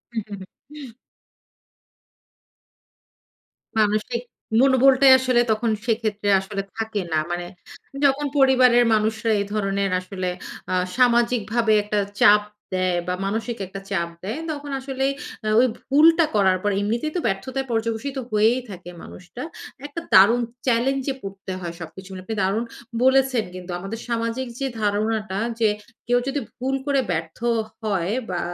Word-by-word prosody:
উ, - - +1
হু, 205 - -5
হু। 275 +7 -12 2.9
মানুষিক, 215 +3 +1 0.4
মনোবলটাই 270 0 +6
আসলে 255 -2 +3
তখন 220 +2 0 0.2
সেক্ষেত্রে 215 -3 -1
আসলে 195 +1 -4
থাকে 220 -2 -2
না। 155 - +3
মানে, 175 0 -3 0.6
যখন 280 +1 +2
পরিবারের 255 -3 +5
মানুষরা 220 +1 +1
এ - - 0
ধরনের 195 -1 0
আসলে 185 0 -4 0.4
আ - - 0 0.2
সামাজিকভাবে 235 -2 +2
একটা 210 0 -1 0.2
চাপ 210 0 +7 0.4
দেয় 185 -1 +1
বা 180 - 0
মানসিক 225 +4 -2
একটা 195 +1 -7
চাপ 170 -4 -1
দেয়, 220 +9 -4
তখন 290 -1 -6
আসলে 265 0 -3 0.5
ওই 255 - +5 0.2
ভুলটা 325 +4 +6
করার 190 -2 +4
পর 205 - +1
এমনিতেই 235 +9 -1
তো - - +1
ব্যর্থতায় 260 +7 -3
পর্যবসিত 230 +4 -2
হয়েই 220 +4 +3
থাকে 180 -2 -9
মানুষটা। 185 +9 -10 0.4
একটা 295 +3 -6
দারুণ 215 +6 +7 0.3
চ্যালেঞ্জে 265 +3 +1
পড়তে 195 -1 -7
হয় 170 -1 -5
সবকিছু 180 +3 -9
মিলে। 185 -1 -8
আপনি 220 - -4
দারুণ 200 +5 +1 0.4
বলেছেন 260 -3 +3
কিন্তু 180 0 -8
আমাদের 195 +4 -6
সামাজিক 230 +2 -2
যে 275 - -1
ধারণাটা 210 -1 0 0.2
যে, 220 - +4 0.4
কেউ 245 0 +3
যদি 280 +1 -1 0.2
ভুল 265 +2 -1
করে 280 -1 +2
ব্যর্থও 170 +9 -1 0.3
হয়, 195 -4 -1 0.2
বা 180 - -2
225 Hz, 135 wpm, -23 LUFS, 195-255 Hz, 2.9 s, চাপ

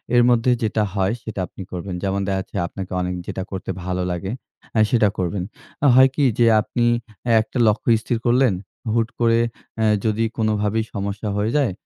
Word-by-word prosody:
এর 120 - +6
মধ্যে 120 +1 +3
যেটা 110 0 +1
হয় 95 0 +1
সেটা 110 -3 -6
আপনি - - -11
করবেন। 90 +1 -5
যেমন 100 0 0
দেখাচ্ছে 95 -1 -3
আপনাকে 95 +1 -7
অনেক 90 0 -2
যেটা 95 - -3
করতে 95 -1 -4
ভালো 90 0 -2
লাগে, 90 +3 -3 0.5
আ - - +5
সেটা 110 -5 +4
করবেন। 90 +1 -1 0.4
আ - - +7
হয় 130 +1 +7
কি 145 - +1 0.2
যে 120 - +6 0.2
আপনি 120 +2 -1 0.6
একটা 110 - -6
লক্ষ্য 105 +2 +1
স্থির 120 - -1
করলেন, 120 -1 +4 0.4
হুট 115 0 +1
করে 115 -1 +3 0.4
অ্যা 110 - +1 0.2
যদি 110 +1 +1
কোনোভাবেই 110 0 +1
সমস্যা 100 +1 -3
হয়ে 105 +2 0
যায়, 140 -7 +2
105 Hz, 175 wpm, -22 LUFS, 95-115 Hz, 0.6 s, আ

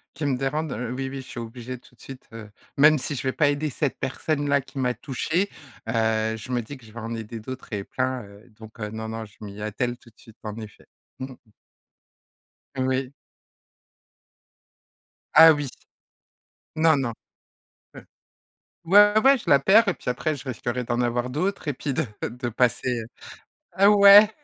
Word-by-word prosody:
qui 150 +1 -4
me 135 -2 0
dérange, 150 +3 -2 0.2
oui, 135 0 -3
oui, 135 - -8
je 130 - -14
suis 120 - -7
obligée 120 +2 -7
tout 125 - -22
de - - -40
suite, 135 -1 -11
heu, 115 -2 -9 0.3
même 150 +1 +6
si 145 - -4
je 125 - -4
vais 130 - 0
pas 145 +1 +2
aider 145 +1 -1
cette 140 +1 -2
personne-là 140 +1 0
qui 135 - -15
m'a 125 -2 +1
touchée, 155 - -2 0.4
heu, 110 -1 +1
je 110 +4 -9
me 125 -1 0
dis 130 +5 -9
que 125 - -18
je 110 - -15
vais 120 - -7
en 115 0 -5
aider 115 0 -7
d'autres 130 +2 -9
et 100 -1 -2
plein, 130 +3 -2
heu, 100 +1 -16
donc 110 0 -13
non, 110 +1 -5
non, 110 0 -5
je 105 - -19
m'y 105 -1 -9
attelle 120 +4 -3
tout 120 - -19
de - - -32
suite, 115 0 -17
en 105 -1 -5
effet. 110 -2 -11 0.3
Mmh 130 +1 -6
mh. 120 -3 -24 1.3
Oui. 130 0 -1 2.2
Ah, 160 0 +9
oui! 145 -2 -3 1.1
Non, 160 -1 +4
non. 130 -4 -1 0.8
Ouais. - - -10 0.8
Ouais, 205 +4 +6
ouais, 270 +2 +6
je - - -6
la 140 - +7
perds 205 +10 +5
et 195 - +2
puis - - -5
après 150 +5 -1
je 135 - -11
risquerais 125 0 -3
d'en 120 0 -1
avoir 120 +1 -1
d'autres 180 +6 -2
et 145 - 0
puis 135 +2 -4
de 155 +3 0 0.2
de 120 +1 -5
passer, 125 +1 0
heu - - -8 0.7
Ah, 195 +3 +5
ouais, 205 +1 +9
130 Hz, 185 wpm, -24 LUFS, 115-145 Hz, 2.2 s, Ah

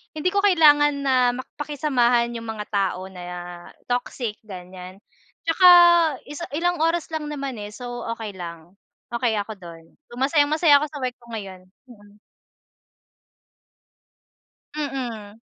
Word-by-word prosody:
hindi 335 +4 0
ko 400 - +1
kailangan 295 -7 +4
na 265 -1 +2 0.2
mak 255 - -8
pakisamahan 250 -5 +1
yung 230 -1 -7
mga 220 -1 -4
tao 190 -2 -1
na 180 -1 -10 0.7
toxic, 245 -3 -3
ganiyan. 185 -1 -11 0.4
Tsaka 330 +3 +2 0.6
isa 295 +4 -7
ilang 350 +1 0
oras 330 +1 0
lang 315 -2 -4
naman, 275 -5 -5
eh, 205 +1 -8
so 245 -1 -7
okey 220 -3 -6
lang. 170 -1 -8 0.4
Okey 235 -2 0
ako 205 0 -4
dun. 170 -2 -11 0.2
So, 240 - -12
masayang-masaya 290 +3 +4
ako 300 - -1
sa 295 -2 -9
work 250 -1 -2
ko 235 - -20
ngayon. 190 -3 -8 0.3
Mm. 205 -2 -17 2.6
Mhm. 240 -8 -5
245 Hz, 130 wpm, -23 LUFS, 205-295 Hz, 2.6 s, kailangan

